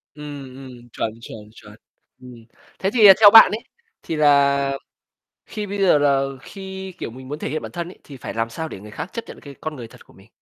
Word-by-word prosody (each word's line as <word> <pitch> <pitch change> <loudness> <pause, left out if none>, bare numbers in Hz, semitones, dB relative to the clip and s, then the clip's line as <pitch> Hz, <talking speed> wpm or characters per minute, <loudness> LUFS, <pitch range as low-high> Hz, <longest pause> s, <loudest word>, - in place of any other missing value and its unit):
Ừm, 145 -3 -9
ừm, 125 -3 -13
chuẩn, 110 - -3
chuẩn, 115 - -10 0.2
chuẩn. 105 -1 -15 0.5
Ừm, 120 -3 -13 0.3
thế 190 - 0
thì 220 -4 +7
theo 210 -2 +10
bạn 225 -3 +9
ấy, 220 +3 -4 0.4
thì 165 - -4
là 140 -2 +3 0.7
khi 210 -2 -6
bây 200 +1 -5
giờ 180 -5 +5
là 140 -2 +2 0.2
khi, 190 +1 -9
kiểu, 115 - -6
mình 130 +2 -12
muốn 150 +3 -6
thể - - -4
hiện 155 - -3
bản - - -8
thân 170 -1 -5
ấy 185 - -15
thì 140 -3 -12
phải - - -7
làm 115 0 -2
sao 160 +8 -5
để 95 - -9
người 105 +1 -12
khác 170 - -7
chấp 230 - -5
nhận - - -11
cái 140 -1 -12
con 155 -1 -5
người 120 -4 -9
thật - - -18
của - - -22
mình? 95 +2 -20
140 Hz, 235 wpm, -21 LUFS, 125-185 Hz, 0.7 s, theo